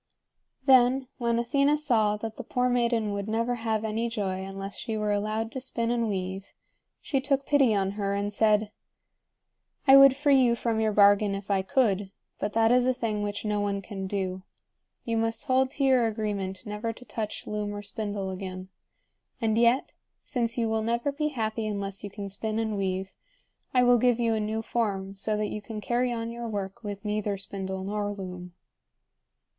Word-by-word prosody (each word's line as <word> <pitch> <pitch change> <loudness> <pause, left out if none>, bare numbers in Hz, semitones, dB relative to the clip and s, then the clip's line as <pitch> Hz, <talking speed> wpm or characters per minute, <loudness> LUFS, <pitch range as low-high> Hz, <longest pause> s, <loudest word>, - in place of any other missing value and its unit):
Then, 260 -1 +5
when 235 -1 +1
Athena 280 +5 +2
saw 225 -8 +2
that 220 0 -6
the 255 - -5
poor 250 +2 0
maiden 235 -3 +1
would 200 0 -3
never 230 +2 0
have 225 -2 -1
any 225 +2 -1
joy 190 -4 -2
unless 195 +1 -6
she 225 -2 -3
were 210 -1 0
allowed 215 +2 -1
to 260 - -5
spin 235 -3 -1
and 235 -2 0
weave, 190 0 -4 0.5
she 270 -3 -1
took 275 0 0
pity 275 -7 +4
on 195 -1 +1
her 200 -1 -2
and 205 +1 -2
said: 215 0 +3 1.1
"I 270 -1 +9
would 275 -1 +8
free 280 -1 +4
you 240 -2 +4
from 230 -1 -1
your 220 -1 +2
bargain 205 0 +5
if 195 0 -5
I 195 -1 +3
could, 200 -2 +1 0.3
but 205 - -2
that 225 0 +4
is 250 0 +4
a 255 - +2
thing 215 -4 -2
which 205 +1 -3
no 210 -1 0
one 200 -1 -1
can 195 -1 -6
do. 190 -1 -2 0.6
You 230 -1 0
must 225 0 0
hold 260 -1 +2
to 275 - -3
your 260 -3 +4
agreement 205 -3 -3
never 210 +2 -3
to 250 - -14
touch 215 -3 -5
loom 210 -1 -3
or 205 - -6
spindle 200 -2 -4
again. 185 0 -6 0.7
And 220 -1 +1
yet, 235 +3 +3 0.3
since 235 -2 -2
you 230 -1 +1
will 220 0 0
never 235 +5 0
be 300 +2 -1
happy 225 -5 -2
unless 200 -1 -3
you 205 - -5
can 200 0 -6
spin 215 +2 -3
and 220 -1 -1
weave, 190 -1 -2 0.6
I 250 -1 +4
will 245 -1 +5
give 245 0 +3
you 230 -1 +2
a 220 - 0
new 215 +1 -2
form 195 -5 -2
so 210 +2 -1
that 210 -1 -1
you 210 - -4
can 215 +1 -6
carry 245 +3 0
on 230 -1 -3
your 235 0 -5
work 200 -2 -4
with 205 0 -6
neither 210 -1 -1
spindle 190 -1 -5
nor 205 +1 -2
loom." 180 -3 -7
215 Hz, 195 wpm, -27 LUFS, 200-235 Hz, 1.1 s, I